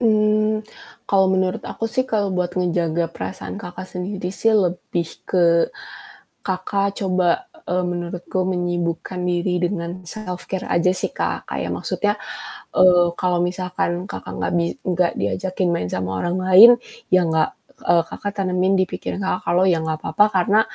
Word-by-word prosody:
Mmm, 215 -1 +3 0.5
kalau 195 -1 +4
menurut 185 -1 0
aku 225 - -4
sih 255 +3 0
kalau 215 -5 0
buat 180 -1 -1
ngejaga 170 -2 0
perasaan 95 - -6
Kakak 180 +1 -8
sendiri 185 0 -4
sih 225 +4 +1
lebih 180 -4 0 0.2
ke 170 -2 +3 0.7
Kakak 195 +1 -1
coba, 185 -2 +1 0.2
eee, 180 +1 0
menurutku 175 +1 -3
menyibukkan 175 -1 -2
diri 180 0 0
dengan 175 0 -3
self-care 185 -1 -5
aja 170 +2 +3
sih - - -2
Kak. - - -3
Kayak - - -3
maksudnya, 205 0 -1 0.6
eee, 180 -1 +6
kalau 180 -1 +1
misalkan 180 0 -2
Kakak - - -7
enggak - - -1
bi 170 - +1 0.2
enggak 180 -1 +2
diajakin 185 -1 -1
main 90 - -2
sama 95 0 -2
orang 175 +1 -1
lain, 185 +5 +9 0.4
ya 185 -1 +4
enggak 160 -1 0 0.2
eee, 170 -1 +4
Kakak 205 +3 -5
tanamin 185 0 +2
di 185 - +3
pikiran - - -5
Kakak 185 - -1
kalau, 175 +2 +4
"Ya 170 -4 +2
enggak 160 -1 -2
apa-apa, 160 +6 +4
karena 200 +2 +3
180 Hz, 150 wpm, -21 LUFS, 175-190 Hz, 0.7 s, lain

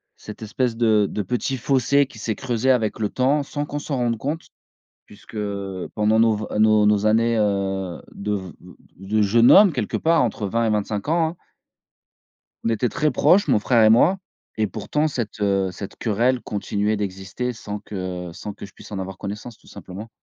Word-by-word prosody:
cette 105 - -11
espèce 115 +2 -2
de 110 -3 +3
de 105 - -3
petit 125 +6 -2
fossé 135 +3 +2
qui 135 -3 -15
s'est 110 0 -3
creusé 130 0 0
avec 115 -5 0
le 105 -2 0
temps, 140 +3 +1
sans 145 +1 -4
qu'on 145 0 -4
s'en 145 -3 -3
rende 120 -2 0
compte. 145 +8 -4 0.6
Puisque, 105 +2 -16
heu, 100 -3 -4
pendant 105 +1 +2
nos 115 -1 +4
v 105 +1 -4
nos 110 -1 +5
nos 105 0 +3
années, 115 +2 +3
heu, 95 -3 -1
de 105 +1 -4
v 95 -3 -5
v 90 -1 -15 0.3
de 110 +2 +1
jeunes 115 +4 +5
hommes 200 -3 +8
quelque 120 -8 -2
part, 165 -1 +3
entre 110 -3 -2
20 115 +4 0
et - - +1
25 105 0 -2
ans, 165 +1 +2
hein 165 - -8 1.3
On - - 0
était 115 +2 0
très 155 +6 +1
proches, 200 +3 +4
mon - - +3
frère 115 +1 +3
et 110 - +6
moi 150 - +5 0.4
et 110 -1 +1
pourtant 150 +9 -1
cette, 120 -8 -4
heu, 95 -2 +1
cette 95 +2 -8
querelle 120 +3 +1
continuait 105 +1 -2
d'exister 100 +5 -4
sans 105 -2 -6
que 95 -3 -6
sans 105 +4 -7
que - - -9
je 100 - -19
puisse - - -14
en 100 - -4
avoir 95 0 -6
connaissance 105 +4 -7
tout - - -24
simplement. 100 +5 -9
110 Hz, 200 wpm, -22 LUFS, 100-125 Hz, 1.3 s, hommes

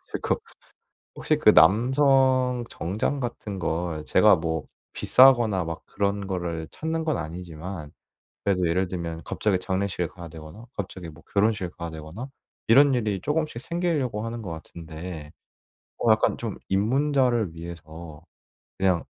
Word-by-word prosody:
그래가지고 - - -1 0.8
혹시 - - +1
그 - - +6
남성 130 - +4
정장 100 - -2
같은 110 -5 -5
걸 80 -2 -2
제가 - - +5
뭐 80 -2 -3 0.3
비싸거나 120 -8 +5
막 80 0 -5
그런 100 0 -1
거를 85 -4 -3
찾는 160 0 -3
건 155 - 0
아니지만 85 0 -7 0.5
그래도 90 -4 +2
예를 90 +2 +1
들면 85 -2 -5
갑자기 100 +4 0
장례식에 95 -1 -1
가야 85 0 -10
되거나 80 +7 -11
갑자기 95 -3 -5
뭐 80 0 -13
결혼식에 105 -3 +1
가야 85 -1 -4
되거나 80 - -8 0.4
이런 135 +4 +6
일이 105 -6 -1
조금씩 150 - -1
생기려고 155 -9 -1
하는 115 0 -5
것 95 - -6
같은데 80 -1 -8 0.7
뭐 - - +3
약간 - - +3
좀 - - -5
입문자를 120 - +2
위해서 80 -1 -9 0.6
그냥 95 -3 +2
95 Hz, 300 characters per minute, -25 LUFS, 85-120 Hz, 0.8 s, 그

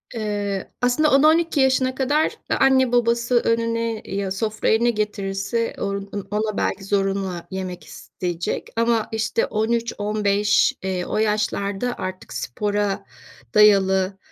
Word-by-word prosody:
Eee, 205 -3 -3
aslında 250 +5 +3
10-12 310 +2 +4
yaşına 260 -1 +2
kadar 290 +4 +1
a - - +2
anne 260 -2 +4
babası 235 0 +2
önüne 230 -1 0
ya, 195 -1 -3
sofraya 215 +2 0
ne 240 - +3
getirirse 210 +1 -2
on 200 0 -3
on 200 -2 -5
ona 215 0 -1
belki 195 0 -1
zorunla 195 -3 -1
yemek 185 -2 -5
isteyecek 175 -2 -5
ama, 230 -1 +1
işte, 220 +1 0
13-15 210 -2 +1
eee, 185 -2 -2
o - - -3
yaşlarda 210 +1 -1
artık 185 0 -6
spora 205 - -2 0.5
dayalı, 195 -2 +4
210 Hz, 120 wpm, -22 LUFS, 195-235 Hz, 0.5 s, 10-12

